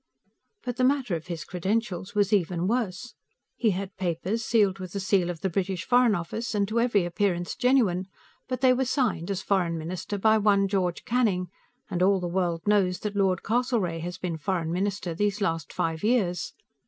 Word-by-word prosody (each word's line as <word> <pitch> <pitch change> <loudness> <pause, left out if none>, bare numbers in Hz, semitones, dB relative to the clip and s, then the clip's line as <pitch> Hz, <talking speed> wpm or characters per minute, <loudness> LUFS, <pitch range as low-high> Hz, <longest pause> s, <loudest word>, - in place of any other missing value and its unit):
But 245 -1 -4
the 255 - +1
matter 260 -7 +2
of 160 +1 -7
his 170 -3 -4
credentials 190 +1 -2
was 205 0 +2
even 180 -2 +1
worse. 230 -1 -2 0.4
He 230 - +2
had 195 0 -3
papers, 185 +5 -2
sealed 205 -4 +2
with 185 -2 -7
the 200 - -2
seal 190 -2 +1
of 170 -3 -5
the 190 - 0
British 185 0 -2
Foreign 245 -3 +4
Office, 210 +7 -4
and 200 -1 +1
to 230 +2 +1
every 230 -6 +2
appearance 175 0 -1
genuine 220 -8 +2 0.4
but 255 -1 -3
they 260 -1 +6
were 260 +1 +1
signed, 240 - 0
as 195 -2 -2
Foreign 175 -4 +1
Minister, 175 +5 -4
by 220 +2 +4
one 200 -1 +3
George 185 -3 -1
Canning, 210 -8 +1 0.4
and 180 -3 -3
all 195 +1 +4
the 180 - -3
world 175 -2 -1
knows 195 -3 +2
that 210 -1 -3
Lord 190 -3 +1
Castlereagh 220 -8 0
has 175 +2 -5
been 175 -3 -3
Foreign 165 0 -1
Minister 190 -1 -2
these 205 +4 0
last 165 -5 -1
five 165 +1 -2
years. 205 -7 +1
195 Hz, 190 wpm, -27 LUFS, 175-220 Hz, 0.4 s, they